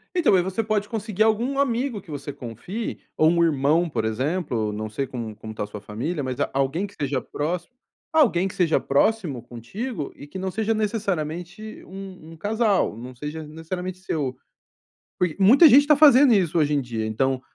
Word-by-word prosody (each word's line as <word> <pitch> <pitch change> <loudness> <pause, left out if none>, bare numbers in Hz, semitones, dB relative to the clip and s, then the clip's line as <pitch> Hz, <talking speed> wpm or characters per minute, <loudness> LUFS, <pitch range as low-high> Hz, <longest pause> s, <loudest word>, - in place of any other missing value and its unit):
Então, 330 - +4
aí 180 - +4
você 190 +5 -2
pode 210 -1 -1
conseguir 215 -2 0
algum 235 +6 +1
amigo 245 -4 0
que 185 - -21
você 145 0 -5
confie, 135 - -6 0.2
ou 155 +1 +5
um 170 0 +3
irmão, 160 +2 +2
por 110 -5 -2
exemplo, 125 -1 -1
não 110 +1 -4
sei 135 +6 -2
como 115 -4 -6
como 110 +1 -9
está 110 - -4
a - - -5
sua 105 0 -9
família, 135 - -4
mas 130 -1 -4
a - - 0
alguém 140 +8 0
que 200 - -17
esteja 140 -5 -2
próximo, 170 - -4 0.4
alguém 205 - +4
que - - -8
seja 170 -3 +2
próximo 145 - +1
contigo 145 - -6
e 145 - -11
que 190 +6 -7
não 190 0 -3
seja 220 +2 0
necessariamente 195 -2 -3
um 185 -4 -10
um - - -13
casal, 205 - +1
não 125 +2 -9
seja 150 +5 -6
necessariamente 180 +4 -6
seu 145 -8 -3 0.8
Porque 180 -4 +1
muita 255 - +8
gente 285 +3 +7
tá 300 - +6
fazendo 280 -3 +7
isso 180 -5 +2
hoje 150 -1 +2
em 145 - +2
dia. 115 -3 -4
Então, 130 +4 0
170 Hz, 190 wpm, -24 LUFS, 135-210 Hz, 0.8 s, muita